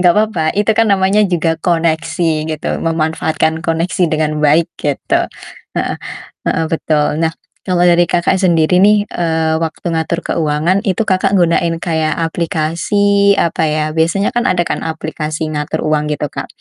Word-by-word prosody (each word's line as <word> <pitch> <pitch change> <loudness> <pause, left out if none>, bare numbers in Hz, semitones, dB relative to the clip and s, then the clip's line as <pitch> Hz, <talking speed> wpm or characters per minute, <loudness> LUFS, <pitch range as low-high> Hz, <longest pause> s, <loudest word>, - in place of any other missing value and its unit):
Nggak 180 -1 +5
apa-apa, 210 -7 +1
itu 210 +2 +2
kan 225 0 +2
namanya 195 +1 +3
juga 165 -2 0
koneksi 165 -1 0
gitu, - - -5
memanfaatkan 160 0 -1
koneksi 170 +2 0
dengan 155 -1 -1
baik 155 +2 +3
gitu. 145 -2 -1 0.5
Heeh - - -1 0.6
heeh, 160 - 0
betul. 150 -2 0
Nah 160 0 +1 0.4
kalau 175 -1 +2
dari 175 0 +5
Kakak 175 +1 +1
sendiri 170 -2 +2
nih, 210 0 +5
eee, 160 -2 -1
waktu 165 +1 -4
ngatur 160 +1 -1
keuangan, 160 +4 0
itu 185 - 0
Kakak 190 0 +1
gunain 170 -1 +2
kayak 160 -2 0
aplikasi, 175 +5 +1
apa 165 -1 0
ya, 155 0 0
biasanya 170 +5 +1
kan 240 +1 +1
ada 175 -1 +1
kan - - -3
aplikasi 155 0 -4
ngatur 150 +1 -3
uang 150 -1 0
gitu, 150 0 -2
Kak, - - -5
165 Hz, 150 wpm, -15 LUFS, 155-180 Hz, 0.6 s, Nggak